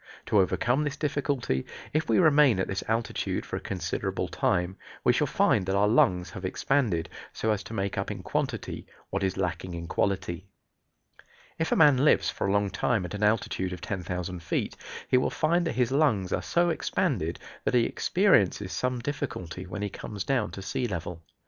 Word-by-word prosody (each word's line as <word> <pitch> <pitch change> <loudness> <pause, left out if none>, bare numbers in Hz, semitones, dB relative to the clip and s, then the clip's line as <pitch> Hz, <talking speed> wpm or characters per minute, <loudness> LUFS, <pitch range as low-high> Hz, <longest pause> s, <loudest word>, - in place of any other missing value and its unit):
To 105 - +3
overcome 120 +9 +2
this 145 -1 -3
difficulty, 140 - -1 0.3
if 155 +1 0
we - - +4
remain 150 - +5
at 95 - 0
this 95 - -3
altitude 115 0 -1
for - - -5
a - - -6
considerable - - -2
time, 90 0 0 0.3
we - - +5
shall - - +1
find 95 - +2
that 95 - +1
our 100 +1 +4
lungs 90 -5 +3
have 100 -4 -8
expanded, 95 -2 0 0.3
so 110 - 0
as 105 -2 0
to 115 - -7
make 100 -1 -1
up - - -2
in - - -5
quantity - - -3 0.2
what 100 - -1
is 95 -1 0
lacking 90 0 -2
in 85 0 -5
quality. 95 -1 -1 1.1
If 160 - 0
a - - +4
man 145 -4 +6
lives 150 - +4
for - - -2
a - - +1
long 100 -1 +1
time 110 -7 0
at 90 - -7
an 105 - -4
altitude 105 -3 +1
of 90 - -8
10,000 90 -1 -4
feet 85 - -2 0.3
he 125 - +4
will 125 - +2
find 170 +2 +1
that - - -1
his 125 -1 +1
lungs 130 - +2
are - - 0
so 175 0 +2
expanded 85 - -1 0.3
that - - +1
he 120 - +5
experiences 105 - +2
some 125 0 -1
difficulty 95 - -4
when 105 +3 -5
he 105 - -1
comes 100 -1 -5
down 125 -4 0
to 95 - -7
sea 125 +6 -1
level. 90 -4 -5
105 Hz, 195 wpm, -28 LUFS, 90-130 Hz, 1.1 s, man